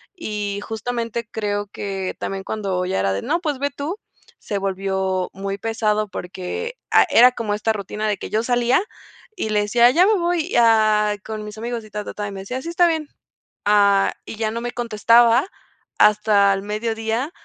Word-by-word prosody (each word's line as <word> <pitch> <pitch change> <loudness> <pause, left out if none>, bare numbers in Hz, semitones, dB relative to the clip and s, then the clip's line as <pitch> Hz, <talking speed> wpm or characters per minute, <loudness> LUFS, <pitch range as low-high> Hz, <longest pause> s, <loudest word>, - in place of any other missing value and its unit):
Y 210 - -4
justamente 230 0 -4
creo 205 -2 -2
que 195 -2 -4
también 195 0 -4
cuando 195 -4 -2
ya 180 - -1
era 95 0 +1
de, 95 +1 -2
no, 340 - 0
pues 300 -6 -2
ve 285 +1 -1
tú, 290 +7 -5 0.4
se 205 - -4
volvió 190 -1 -1
muy 195 +1 -4
pesado 215 -1 0
porque, 190 - -5 0.2
ah, - - +6
era 250 +2 +7
como 225 -4 -2
esta 215 +1 0
rutina 210 +1 -4
de 210 - +1
que - - -7
yo 215 - +1
salía, 245 +5 +2 0.5
y 220 - -3
le 210 -1 +2
decía: 235 +3 +5
"Ya 345 +7 +5
me 430 - +4
voy 345 -2 -1
a 215 -2 +4
con 215 -1 -5
mis 210 0 -9
amigos", 235 +1 -4
y 215 - -14
ta 210 0 -5
ta - - -6
ta. 205 - -4
Y 200 - -5
me 195 - -7
decía: 250 +7 -5
"Sí, 330 - -6
está 345 +1 +3
bien". 315 -3 -2 0.6
Ah, 200 -1 +4
y - - -7
ya 220 -1 0
no 230 +1 -4
me 240 0 -3
contestaba 235 +1 +4 0.5
hasta 210 -1 +5
el 195 - -5
mediodía 225 +6 -2
215 Hz, 195 wpm, -21 LUFS, 200-240 Hz, 0.6 s, era